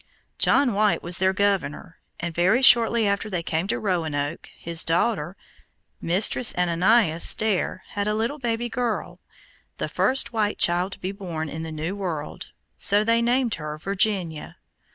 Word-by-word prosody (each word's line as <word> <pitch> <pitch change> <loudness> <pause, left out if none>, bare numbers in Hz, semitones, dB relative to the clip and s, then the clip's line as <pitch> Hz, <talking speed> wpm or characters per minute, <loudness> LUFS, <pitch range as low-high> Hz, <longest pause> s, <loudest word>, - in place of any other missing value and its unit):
John 255 -5 +3
White 210 +1 +1
was 175 +1 0
their 190 0 +2
governor, 190 -6 -2 0.2
and 170 0 -4
very 190 +10 +2
shortly 235 -3 +5
after 200 +1 -1
they 180 -4 -3
came 165 +3 -2
to - - 0
Roanoke, 160 -7 -3
his 170 -1 0
daughter, 175 0 -1 0.6
Mistress 205 +7 +3
Ananias 180 0 +3
Dare, 215 -4 -2
had 205 0 -3
a 210 - 0
little 230 +7 -2
baby 240 -1 -2
girl, 240 -2 -3 0.6
the - - -3
first 265 -2 +2
white 210 -2 -1
child 175 +3 0
to - - -11
be 185 - -4
born 170 -6 -6
in 160 - -6
the 160 0 -6
new 160 +5 -4
world, 170 -7 -6 0.2
so 205 +1 +3
they 230 +1 +2
named 240 0 +1
her 150 0 -6
Virginia. 190 -3 -2
195 Hz, 155 wpm, -23 LUFS, 165-220 Hz, 0.6 s, shortly